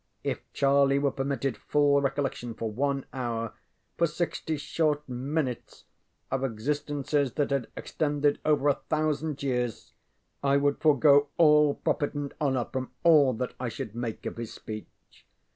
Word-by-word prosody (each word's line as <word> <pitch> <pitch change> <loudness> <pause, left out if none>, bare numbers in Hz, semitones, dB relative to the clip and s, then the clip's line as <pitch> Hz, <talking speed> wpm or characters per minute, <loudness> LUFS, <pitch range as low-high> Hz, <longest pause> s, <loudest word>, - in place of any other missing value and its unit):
If - - -2
Charlie 140 0 +3
were 140 0 +1
permitted 135 -2 -2
full 145 -1 +3
recollection 135 -4 -2
for 110 -1 -3
one 135 +4 -1
hour 115 -3 -3 0.5
for 170 - +4
sixty 160 -1 -2
short 150 0 -1
minutes 130 0 -3 0.5
of 135 0 0
existences 145 +3 -1
that 145 -2 0
had 135 -4 0
extended 145 -1 0
over 150 -2 +2
a 140 - +1
thousand 155 -1 -1
years 125 -4 -2 0.5
I 140 0 +3
would 140 0 +1
forego 145 -1 +5
all 150 -3 +5
profit 145 0 -1
and 145 -1 -4
honor 130 -5 +1
from 130 -1 -4
all 150 -6 +6
that 125 +2 -3
I 125 -1 -2
should 115 -2 -6
make 120 -1 -5
of - - -4
his 115 -1 -5
speech. 110 -1 -7
140 Hz, 145 wpm, -28 LUFS, 130-145 Hz, 0.5 s, all